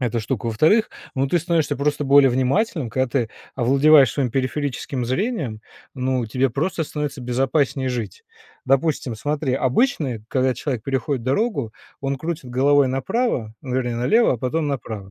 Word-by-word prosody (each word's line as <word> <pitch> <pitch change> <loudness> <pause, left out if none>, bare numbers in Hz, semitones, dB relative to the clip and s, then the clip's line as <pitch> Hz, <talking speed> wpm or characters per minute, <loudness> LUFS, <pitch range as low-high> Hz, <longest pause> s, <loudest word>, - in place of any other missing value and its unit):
эта 120 -2 -1
штука. 110 +2 -3
Во-вторых, 155 - +3 0.2
ну, 135 +1 +1
ты 175 - +2
становишься 165 -2 0
просто 145 +2 0
более 140 0 +6
внимательным; 130 - 0
когда 130 +3 0
ты 120 -3 -1 0.2
овладеваешь 135 +2 +5
своим 135 -4 -1
периферическим 135 0 -2
зрением, 130 - -2 0.3
ну, 130 -2 -1
тебе 130 +4 0
просто 160 +7 -1
становится 150 -2 -4
безопаснее 130 +2 0
жить. 115 -6 -5 0.4
Допустим, 135 -2 +1
смотри: 145 +2 -1
обычно 135 - +1
и 110 - -12
когда 130 -1 +1
человек 125 -2 -3
переходит 135 0 -2
дорогу, 135 - -1 0.3
он 135 0 -2
крутит 160 0 -5
головой 140 +2 +3
направо, 135 - -1
ну, 130 -1 -4
вернее, 120 -2 -1
налево, 215 - +3
а - - -3
потом 150 +6 -1
направо. 110 -8 -5
135 Hz, 155 wpm, -22 LUFS, 125-150 Hz, 0.4 s, более